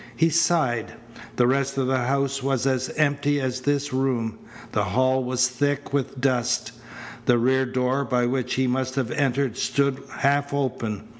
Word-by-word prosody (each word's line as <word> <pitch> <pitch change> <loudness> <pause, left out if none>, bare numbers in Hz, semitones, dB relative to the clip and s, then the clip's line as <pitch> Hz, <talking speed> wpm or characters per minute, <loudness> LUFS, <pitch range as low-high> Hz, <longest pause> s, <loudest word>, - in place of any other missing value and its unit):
He 165 +8 +3
sighed. 150 -8 +1 0.4
The 125 - +3
rest 135 +2 +1
of 135 - +1
the 130 0 +1
house 135 +2 0
was 135 -1 0
as 130 -1 0
empty 145 -1 +2
as 130 -1 -2
this 145 0 -1
room. 120 -4 -1 0.3
The - - +1
hall 130 +6 +2
was 125 0 +2
thick 145 +2 -2
with 135 -1 -1
dust. 125 -2 0 0.6
The 120 - +5
rear 130 +2 +2
door 130 +2 0
by 125 -2 +1
which 125 0 -1
he 130 - +1
must 130 0 -1
have 130 -4 -1
entered 135 -3 0
stood 140 -1 0
half 140 +1 0
open. 125 -6 -3
130 Hz, 165 wpm, -24 LUFS, 125-140 Hz, 0.6 s, The